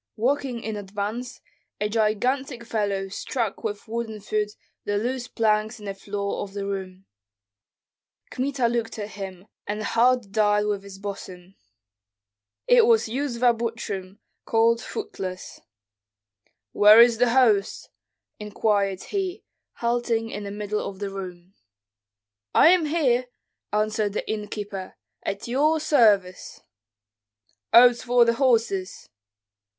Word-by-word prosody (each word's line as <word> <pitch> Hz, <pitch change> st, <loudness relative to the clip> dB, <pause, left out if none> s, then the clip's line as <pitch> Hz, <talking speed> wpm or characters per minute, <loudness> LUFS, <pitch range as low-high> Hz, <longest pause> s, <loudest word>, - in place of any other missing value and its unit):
Walking 250 Hz, 0 st, -1 dB
in 220 Hz, -1 st, -4 dB
advance, 205 Hz, +5 st, -5 dB, 0.4 s
a 210 Hz, -, 0 dB
gigantic 235 Hz, +4 st, 0 dB
fellow 205 Hz, -4 st, -1 dB
struck 225 Hz, +1 st, -3 dB
with 210 Hz, 0 st, -4 dB
wooden 225 Hz, -1 st, -4 dB
foot 210 Hz, 0 st, -2 dB, 0.3 s
the 205 Hz, 0 st, -1 dB
loose 245 Hz, +3 st, -2 dB
planks 215 Hz, 0 st, 0 dB
in 210 Hz, -, -11 dB
the 200 Hz, -, -3 dB
floor 200 Hz, +1 st, -4 dB
of 195 Hz, -1 st, -7 dB
the 200 Hz, -1 st, -4 dB
room. 190 Hz, -1 st, -5 dB, 1.3 s
Kmita 260 Hz, -1 st, 0 dB
looked 230 Hz, -1 st, -2 dB
at 210 Hz, 0 st, -5 dB
him, 190 Hz, -2 st, -8 dB, 0.2 s
and 210 Hz, +1 st, -3 dB
the -, -, -3 dB
heart 240 Hz, -3 st, +2 dB
died 210 Hz, -1 st, +2 dB
within 205 Hz, -1 st, -1 dB
his 200 Hz, -1 st, -11 dB
bosom. 195 Hz, -2 st, -8 dB, 1.1 s
It 480 Hz, -2 st, +5 dB
was 455 Hz, -, +4 dB
Yuzva 245 Hz, -2 st, +1 dB
Butrym, 210 Hz, -4 st, -5 dB, 0.3 s
called 230 Hz, +1 st, +2 dB
Footless. 195 Hz, -, -6 dB, 0.8 s
"But -, -, -41 dB, 0.3 s
where 210 Hz, +2 st, +9 dB
is 235 Hz, -1 st, +6 dB
the 245 Hz, -1 st, +4 dB
host?" 220 Hz, -6 st, +2 dB, 0.5 s
inquired 205 Hz, -2 st, 0 dB
he, 390 Hz, 0 st, -3 dB, 0.3 s
halting 235 Hz, -1 st, -1 dB
in 205 Hz, -, -5 dB
the -, -, -5 dB
middle 210 Hz, +1 st, -3 dB
of 195 Hz, -1 st, -6 dB
the 200 Hz, 0 st, -4 dB
room. 185 Hz, -1 st, -8 dB, 1.0 s
"I -, -, +7 dB
am 355 Hz, -2 st, +4 dB
here!" 255 Hz, -6 st, +1 dB, 0.4 s
answered 210 Hz, -1 st, 0 dB
the -, -, -3 dB
innkeeper, 205 Hz, -2 st, -5 dB, 0.3 s
"at 200 Hz, +3 st, -4 dB
your 300 Hz, +6 st, +2 dB
service." 210 Hz, -12 st, +2 dB, 1.1 s
"Oats 245 Hz, 0 st, +7 dB
for 245 Hz, -1 st, +4 dB
the 235 Hz, -, +3 dB
horses!" 230 Hz, -7 st, 0 dB
215 Hz, 125 wpm, -24 LUFS, 200-240 Hz, 1.3 s, where